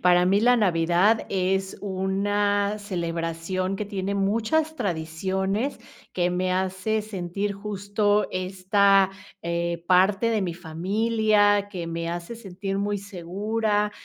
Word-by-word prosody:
Para 180 0 +5
mí, 195 +3 +3
la 245 +1 +5
Navidad 180 +2 +3
es 190 0 0
una 205 +1 0
celebración 170 -1 -3
que 210 - -3
tiene 200 -1 -3
muchas 230 +11 0
tradiciones, 190 - -2 0.3
que 180 -1 +1
me 185 +1 0
hace 190 +4 -1
sentir 200 -1 -3
justo 205 +1 0
esta, 190 +1 +3 0.3
eh, 170 0 -2
parte 195 +5 +4
de 215 -3 +1
mi 175 -3 -2
familia, 205 +4 +1
que 180 -4 -5
me 165 0 -3
hace 175 +6 -5
sentir 195 -2 -5
muy 205 0 -1
segura, 205 +3 -1
195 Hz, 120 wpm, -25 LUFS, 180-205 Hz, 0.3 s, Para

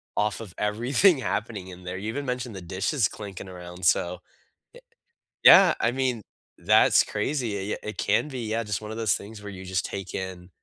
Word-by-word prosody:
off 105 0 0
of 105 -6 -9
everything 125 - +3
happening 100 -6 -3
in 90 0 -11
there, 90 +1 -5
you 105 +3 -4
even 140 +4 -4
mentioned 125 -4 -3
the 95 - -7
dishes 95 - 0
clinking 100 -2 -8
around, 90 0 -10
so, 90 +1 +2 0.5
ye - - -15 0.6
yeah, 190 -2 +9
I 120 - +2
mean, 125 -3 -1 0.4
that's - - +5
crazy, 115 -1 -2
y 95 - -3 0.2
y - - -6
It 105 - -7
can 150 - +1
be, 130 -3 -5
yeah, 115 +1 0
just 105 -1 -3
one 105 - -8
of 110 - -6
those 110 -3 +2
things 105 0 -9
where 105 - -7
you 95 -1 -9
just 95 -1 -1
take 95 -1 -6
in 95 -1 -6
105 Hz, 205 wpm, -26 LUFS, 95-120 Hz, 0.6 s, yeah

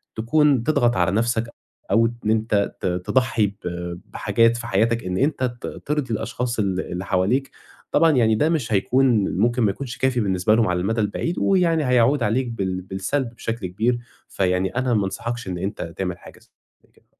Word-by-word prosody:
تكون 135 +3 +2
تضغَط 125 -5 +2
على 90 +1 +2
نَفْسك 115 +2 0 0.4
أو 115 0 +4
إن 115 -2 -2
أنت 110 -2 0
ت - - -4 0.2
تضحّي 120 -5 +2
ب 100 - -8 0.6
بحاجات 115 0 +2
في 120 0 -6
حياتك، 115 +3 +1
إن 90 0 -2
أنت 140 +1 0 0.2
ت - - -4 0.2
ترضِي 145 -5 -1
الأشخاص 120 +2 -3
ال 95 -3 0
اللي 90 +2 -4
حواليك، 105 +10 0 0.4
طبعًا 165 -1 +4
يعني 115 -5 +3
ده 150 +9 +2
مش 135 -10 -1
هيكون، 120 0 +2
ممكن 120 +3 +2
ما 105 - +3
يكونش 130 +4 -7
كافي 130 -2 +1
بالنسبة 95 0 +2
لهُم 115 -1 +3
على 90 -1 0
المدى 110 +5 0
البعيد، 110 - -2
ويعني 170 -6 +2
هيعُود 125 +1 +3
عليك 120 +4 +1
بال 95 -5 -3
بالسلْب 95 +8 -2
بشكل 115 -5 -4
كبير، 115 +7 0 0.3
فيعني 95 +1 0
أنا 130 -1 +1
ما 105 -3 +2
أنصحَكش 120 +3 -4
إن 90 - -3
أنت 100 +4 -4 0.2
تعمل 90 -2 -3
حاجة - - -14 0.4
زي - - -29
كده. - - -28
115 Hz, 180 wpm, -22 LUFS, 100-125 Hz, 0.6 s, أو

